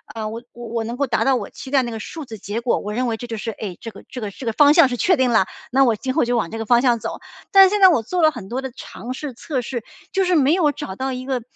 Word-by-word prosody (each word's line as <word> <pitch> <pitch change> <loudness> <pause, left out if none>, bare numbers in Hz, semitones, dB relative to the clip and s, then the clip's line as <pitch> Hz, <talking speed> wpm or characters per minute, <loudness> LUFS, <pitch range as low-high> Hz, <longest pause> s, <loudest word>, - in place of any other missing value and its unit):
呃， 220 -1 -3
我 225 +2 -6
我 240 0 -9
我 230 0 -2
能 235 - -4
够 280 +3 0
达 235 -3 0
到 270 -1 +4
我 - - -4
期 265 - -10
待 270 -1 +3
那 240 - -4
个 225 - -5
数 315 +7 -7
字 225 -3 -9
结 205 +4 -4
果， 240 - +1
我 210 - -5
认 250 +3 0
为 225 -1 -1
这 240 - -7
就 230 - -4
是， 225 +2 -4
哎， 200 -4 -7
这 230 - -7
个 - - -13
这 250 - -7
个 210 -2 -4
这 250 - -10
个 225 - -1
方 290 +4 +6
向 335 -5 +7
是 250 - -2
确 360 +5 +3
定 260 -1 +2
了， 220 -5 +4 0.3
那 270 +2 +4
我 235 -4 +3
今 260 +5 -3
后 - - +2
就 240 0 +1
往 190 - -1
这 225 - -6
个 225 - -4
方 240 +2 +4
向 245 -2 +3
走。 - - -5 0.3
但 390 -3 +9
是 - - +4
现 415 +1 -1
在 380 - +9
我 320 -9 +3
做 350 +11 -2
了 310 -1 +5
很 235 -9 -9
多 255 +3 -3
的 265 - -5
尝 250 -1 -7
试、 275 0 -6
测 260 +2 -3
试， 240 -1 -5 0.3
就 385 -1 +2
是 360 -1 +2
没 285 0 +4
有 335 -5 +3
找 290 -10 -7
到 265 +4 -3
一 255 0 -6
个 260 -2 -1
250 Hz, 360 characters per minute, -21 LUFS, 230-280 Hz, 0.3 s, 但